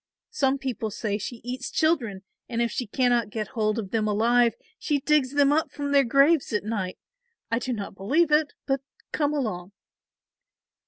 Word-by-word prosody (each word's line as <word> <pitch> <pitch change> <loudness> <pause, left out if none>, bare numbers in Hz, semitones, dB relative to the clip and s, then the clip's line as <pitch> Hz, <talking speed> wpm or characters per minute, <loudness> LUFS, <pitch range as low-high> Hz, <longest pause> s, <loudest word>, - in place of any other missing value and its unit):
Some 275 -10 +1
people 255 -5 -3
say 205 0 -3
she 230 +3 -6
eats 255 +2 -4
children 240 - 0 0.3
and 235 -2 -2
if 235 0 +1
she 250 - -3
cannot 240 -1 +1
get 215 -1 -4
hold 215 -1 0
of 200 -4 -4
them 220 -1 +1
alive 235 +3 +3 0.2
she 295 -2 0
digs 285 -2 +2
them 285 -1 +4
up 315 +2 +1
from 285 -1 -4
their 280 -1 +5
graves 275 +5 +3
at 210 - 0
night. 205 -4 -3 0.5
I 230 - +2
do 255 - -3
not 210 -5 -4
believe 285 - +1
it, 300 -1 +3
but 270 -1 0 0.3
come 290 -1 +1
along." 205 -10 -3
245 Hz, 175 wpm, -26 LUFS, 215-280 Hz, 0.5 s, their